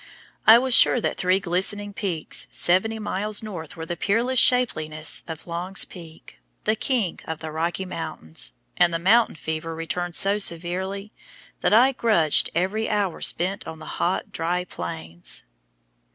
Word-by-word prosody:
I 220 Hz, +1 st, +10 dB
was 255 Hz, +1 st, +1 dB
sure 250 Hz, -, +7 dB
that -, -, -2 dB
three 185 Hz, 0 st, +2 dB
glistening 200 Hz, +3 st, -1 dB
peaks 180 Hz, -6 st, -1 dB
seventy 190 Hz, +6 st, +1 dB
miles 210 Hz, 0 st, -2 dB
north 175 Hz, -7 st, -8 dB
were 160 Hz, -, -6 dB
the 175 Hz, -, -4 dB
peerless 230 Hz, +8 st, +1 dB
shapeliness 155 Hz, -13 st, +2 dB
of 160 Hz, -2 st, -8 dB
Long's 180 Hz, +3 st, -2 dB
Peak, 160 Hz, -, -14 dB, 0.2 s
the 215 Hz, -, +1 dB
king 220 Hz, -5 st, -1 dB
of 160 Hz, -, -4 dB
the 155 Hz, 0 st, -7 dB
Rocky 165 Hz, +4 st, -2 dB
Mountains, 80 Hz, -, -3 dB, 0.2 s
and 175 Hz, -1 st, +4 dB
the 165 Hz, -, 0 dB
"mountain 220 Hz, +7 st, +3 dB
fever" 160 Hz, +1 st, -4 dB
returned 170 Hz, +1 st, -3 dB
so 200 Hz, +1 st, +4 dB
severely 190 Hz, +3 st, -2 dB, 0.5 s
that -, -, +1 dB
I 245 Hz, +5 st, +6 dB
grudged 210 Hz, -, +2 dB
every 195 Hz, +6 st, 0 dB
hour 205 Hz, -4 st, -1 dB
spent 185 Hz, +3 st, +1 dB
on 160 Hz, 0 st, -7 dB
the 175 Hz, +3 st, -2 dB
dry, 170 Hz, +2 st, -1 dB
hot 180 Hz, -, -11 dB
plains. 85 Hz, 0 st, -6 dB
180 Hz, 150 wpm, -24 LUFS, 165-210 Hz, 0.5 s, I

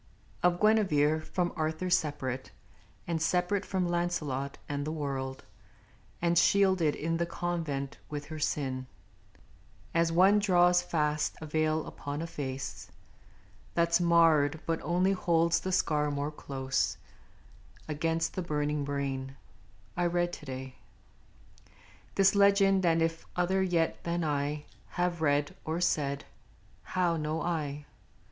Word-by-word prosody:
Of 175 Hz, 0 st, +3 dB
Guinevere 160 Hz, -9 st, +3 dB
from 175 Hz, +2 st, -2 dB
Arthur 160 Hz, +3 st, -2 dB
separate, 145 Hz, -6 st, -1 dB, 0.6 s
And 165 Hz, -2 st, -2 dB
separate 180 Hz, +4 st, +1 dB
from 185 Hz, -3 st, -1 dB
Launcelot 155 Hz, -6 st, -2 dB
and 145 Hz, 0 st, -2 dB
the 155 Hz, -, -3 dB
world, 135 Hz, -4 st, -4 dB, 0.8 s
And 170 Hz, 0 st, +4 dB
shielded 190 Hz, -6 st, +3 dB
in 165 Hz, +2 st, -1 dB
the 170 Hz, 0 st, -1 dB
convent 165 Hz, -6 st, -3 dB
with 145 Hz, -1 st, -5 dB
her 155 Hz, +1 st, -7 dB
sin, 130 Hz, -3 st, -2 dB, 1.1 s
As 170 Hz, 0 st, +2 dB
one 190 Hz, +5 st, +5 dB
draws 180 Hz, -3 st, +4 dB
fast 150 Hz, -3 st, 0 dB
a 155 Hz, -, -7 dB
veil 155 Hz, 0 st, 0 dB
upon 145 Hz, +2 st, -5 dB
a -, -, -3 dB
face 135 Hz, -4 st, -6 dB, 0.8 s
That 170 Hz, 0 st, +2 dB
's 175 Hz, -, +5 dB
marred, 160 Hz, -3 st, +4 dB
but 165 Hz, -1 st, -1 dB
only 180 Hz, +3 st, +2 dB
holds 170 Hz, -3 st, +2 dB
the 185 Hz, -, -3 dB
scar 150 Hz, -5 st, +1 dB
more 145 Hz, +1 st, -2 dB
close 135 Hz, -3 st, -2 dB, 0.9 s
Against 165 Hz, +2 st, -1 dB
the 185 Hz, -, -2 dB
burning 150 Hz, -3 st, -1 dB
brain 135 Hz, -1 st, -3 dB, 0.6 s
I 175 Hz, -, +1 dB
read 175 Hz, 0 st, 0 dB
to 150 Hz, -, -9 dB
day 130 Hz, 0 st, -6 dB, 1.4 s
This 195 Hz, 0 st, +5 dB
legend; 200 Hz, -1 st, +4 dB
and 165 Hz, 0 st, +3 dB
if 165 Hz, 0 st, -2 dB
other 185 Hz, +2 st, +1 dB
yet 175 Hz, -3 st, 0 dB
than 170 Hz, 0 st, -1 dB
I 145 Hz, 0 st, -1 dB, 0.3 s
Have 175 Hz, -2 st, 0 dB
read, 145 Hz, -1 st, +1 dB
or 160 Hz, +2 st, -2 dB
said, 145 Hz, -5 st, 0 dB, 0.6 s
how 175 Hz, -2 st, 0 dB
know 155 Hz, +1 st, -2 dB
I? 150 Hz, -4 st, -2 dB
160 Hz, 130 wpm, -30 LUFS, 145-175 Hz, 1.4 s, one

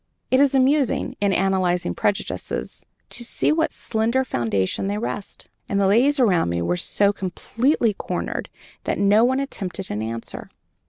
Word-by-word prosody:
It 260 Hz, -, +5 dB
is 280 Hz, -1 st, +4 dB
amusing, 270 Hz, 0 st, +2 dB
in 200 Hz, -1 st, +3 dB
analyzing 185 Hz, -, +1 dB
prejudices, 205 Hz, -, -2 dB, 0.3 s
to 245 Hz, -, 0 dB
see 240 Hz, -, +1 dB
on 310 Hz, -, +1 dB
what 320 Hz, 0 st, +1 dB
slender 235 Hz, +4 st, 0 dB
foundation 115 Hz, -, -1 dB
they 205 Hz, +1 st, -1 dB
rest." 205 Hz, -2 st, -5 dB, 0.2 s
And 200 Hz, -, +1 dB
the 200 Hz, -, +3 dB
ladies 255 Hz, +9 st, +4 dB
around 185 Hz, -, +3 dB
me 85 Hz, 0 st, -1 dB
were 85 Hz, +1 st, 0 dB
so 200 Hz, -, +2 dB
completely 225 Hz, -, 0 dB
cornered -, -, -4 dB, 0.4 s
that -, -, -1 dB
no 205 Hz, +3 st, +4 dB
one 260 Hz, +2 st, +2 dB
attempted 195 Hz, -8 st, -4 dB
an 105 Hz, -, -2 dB
answer. 115 Hz, +1 st, -6 dB
205 Hz, 160 wpm, -22 LUFS, 180-255 Hz, 0.4 s, It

